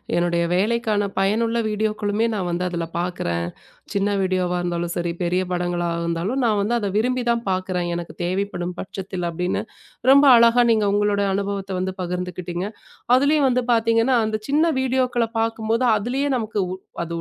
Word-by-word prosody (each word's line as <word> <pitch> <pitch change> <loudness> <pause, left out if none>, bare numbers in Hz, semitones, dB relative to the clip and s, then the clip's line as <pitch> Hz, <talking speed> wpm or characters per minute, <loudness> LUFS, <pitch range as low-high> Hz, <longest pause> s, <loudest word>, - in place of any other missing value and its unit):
என்னுடைய 175 0 +1
வேலைக்கான 210 +1 +1
பயனுள்ள 225 +4 +1
வீடியோக்களுமே 215 0 0
நான் 190 -4 -2
வந்து 175 +1 -1
அதில் 170 -2 -3
பார்க்கிறேன். 85 - -2 0.5
சின்ன 200 0 +1
வீடியோவா 185 -1 0
இருந்தாலும் 175 -1 -2
சரி, 170 -1 -1
பெரிய 180 +1 +1
படங்களாக 175 -1 -1
இருந்தாலும் 170 +10 -1
நான் 215 -3 +2
வந்து 210 +4 0
அதை 205 -3 -2
விரும்பித் 245 +2 0
தான் 235 0 -1
பார்க்கிறேன். 185 -1 -1
எனக்குத் 170 -1 -7
தேவைப்படும் 180 -1 -2
பட்சத்தில் 185 -1 -5
அப்படின்னு, 180 +2 -2 0.5
ரொம்ப 280 +1 +7
அழகா 235 +1 +5
நீங்க 215 -2 +2
உங்களோட 205 0 +1
அனுபவத்தை 200 0 -3
வந்து 185 0 -2
பகிர்ந்துக்கிட்டீங்க. 180 0 -4 0.5
அதிலும் 285 +2 +3
வந்து 250 -1 +1
பார்த்தீங்கன்னா, 230 +2 +3
அந்தச் 215 0 -3
சின்ன 295 +3 +3 0.2
வீடியோக்களைப் 250 -3 0
பார்க்கும்போது, 225 +2 0
அதிலே 245 +7 -2
நமக்கு 220 -2 -5 0.5
அது 170 0 -6
200 Hz, 145 wpm, -22 LUFS, 180-230 Hz, 0.5 s, ரொம்ப